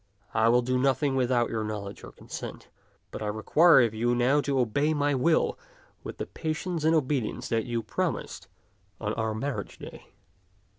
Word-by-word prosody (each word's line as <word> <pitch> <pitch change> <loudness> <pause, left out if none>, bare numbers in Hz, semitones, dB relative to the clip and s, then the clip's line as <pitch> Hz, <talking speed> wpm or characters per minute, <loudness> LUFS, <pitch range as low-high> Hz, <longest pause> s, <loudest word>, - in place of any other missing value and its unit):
I 110 +1 +3
will 120 +1 +4
do 130 +1 0
nothing 135 +1 +1
without 125 -2 +1
your 110 -1 -1
knowledge 105 -2 -5
and - - -11
consent; - - -8 0.4
but - - -7
I 105 - -2
require 135 +9 +5
of 115 -2 0
you 120 +2 +1
now 130 +5 +3
to 140 -1 -1
obey 140 +6 +1
my 145 0 +1
will 150 +5 +2 0.4
with - - -7
the - - -3
patience 160 +1 -3
and 160 +1 +4
obedience 140 -6 -1
that 115 -1 0
you 120 -2 -2
pro 105 - 0
mised - - -8 0.5
on 105 -1 -2
our 110 -1 -2
marriage 135 +5 -4
day." - - -11
125 Hz, 180 wpm, -27 LUFS, 110-145 Hz, 0.5 s, require